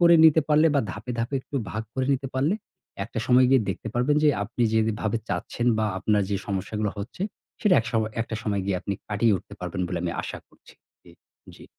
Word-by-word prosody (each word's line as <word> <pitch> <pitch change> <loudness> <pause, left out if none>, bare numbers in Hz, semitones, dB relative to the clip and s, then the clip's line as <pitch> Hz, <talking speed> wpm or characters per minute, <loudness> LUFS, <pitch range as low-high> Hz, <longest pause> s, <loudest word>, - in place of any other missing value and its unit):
করে 170 0 +7
নিতে 160 0 +7
পারলে 155 +2 +5
বা 140 - +4
ধাপে, 110 +4 -7
ধাপে 120 +4 -1
একটু 140 - -6
ভাগ 110 +1 -3
করে 130 -1 0
নিতে 135 +1 -4
পারলে 145 +9 +2 0.5
একটা 115 - -6
সময় 125 0 +6
গিয়ে 135 -2 +6
দেখতে 95 +4 -3
পারবেন 130 +5 +2
যে - - +7
আপনি 120 +3 -2
যেভাবে 110 0 +1
চাচ্ছেন 120 - -2
বা 110 - +2
আপনার 105 0 +2
যে 100 - +1
সমস্যাগুলো 105 +2 -2
হচ্ছে 110 - -6 0.4
সেটা 210 -4 +4
এক - - -8
শ - - -14 0.3
একটা 115 -1 -3
সময় 100 -2 0
গিয়ে 95 -2 0
আপনি 100 +1 -3
কাটিয়ে 105 +1 +3
উঠতে 100 +3 -11
পারবেন 90 +1 -4
বলে 90 -2 -3
আমি 85 -1 -1
আশা - - -5
করছি। - - -20 0.4
এ - - -17 0.4
জী। - - -14
110 Hz, 210 wpm, -25 LUFS, 100-130 Hz, 0.5 s, করে